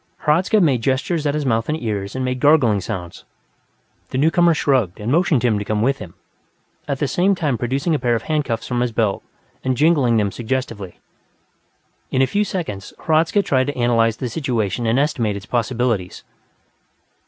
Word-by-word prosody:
Hradzka 175 +8 +3
made 140 - +2
gestures 140 +5 0
at 145 - 0
his 150 -2 -2
mouth 115 -1 0
and 155 +1 -1
ears 105 -4 -4
and 130 0 -2
made 130 0 -2
gargling 125 -8 +4
sounds; 90 -3 -6 0.9
the - - -3
newcomer 165 +3 +3
shrugged 130 - +1
and 105 +3 -3
motioned 160 -5 +2
him 110 -4 +2
to - - -3
come 110 0 0
with 135 +2 +1
him, 85 - -10 0.7
at 140 - -1
the 145 - -1
same 190 +7 +2
time 150 -7 0
producing 135 +8 -1
a 150 - +1
pair 120 -2 +1
of 115 - -3
handcuffs 130 -7 -1
from 125 -1 -1
his 125 -1 0
belt 110 -3 0 0.4
and 130 -1 0
jingling 145 -7 +3
them 105 -2 +1
suggestively. 115 -5 -4 1.1
In 130 - +2
a - - +5
few 205 +9 0
seconds, 160 - -5
Hradzka 165 +5 +2
tried 130 -6 +1
to 145 - -4
analyze 115 -2 +2
the 125 - -3
situation 120 - -2
and 115 +3 +2
estimate 125 -7 0
its 100 - -7
possibilities. 120 -5 -1
125 Hz, 180 wpm, -20 LUFS, 115-150 Hz, 1.1 s, a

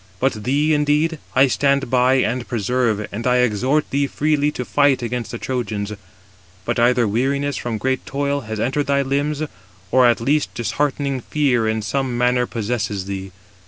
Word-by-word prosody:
But 115 -6 -1
thee, 145 +4 +2
indeed, 150 +2 +1 0.2
I 130 +1 +6
stand 140 -1 +1
by 130 +1 +4
and 125 -1 0
preserve, 115 -2 0
and 115 +4 -3
I 125 - +3
exhort 125 +5 +1
thee 140 +1 +1
freely 150 0 +1
to 125 - -4
fight 140 -2 +2
against 120 0 -3
the 120 - -5
Trojans. 110 -5 -3 0.7
But - - -1
either 120 0 +3
weariness, 140 +6 0
from 115 -2 -3
great 130 +4 -1
toil, 140 +1 -1
has 110 -2 -5
entered 135 +6 0
thy 140 0 +2
limbs, 145 +3 -1 0.5
or 130 -1 +5
at 120 - +3
least 145 +5 0
disheartening 140 +4 -1
fear 130 -5 +1
in 110 0 -1
some 125 +3 -1
manner 125 0 +2
possesses 105 -4 -2
thee. 95 -1 -5
125 Hz, 165 wpm, -20 LUFS, 115-140 Hz, 0.7 s, I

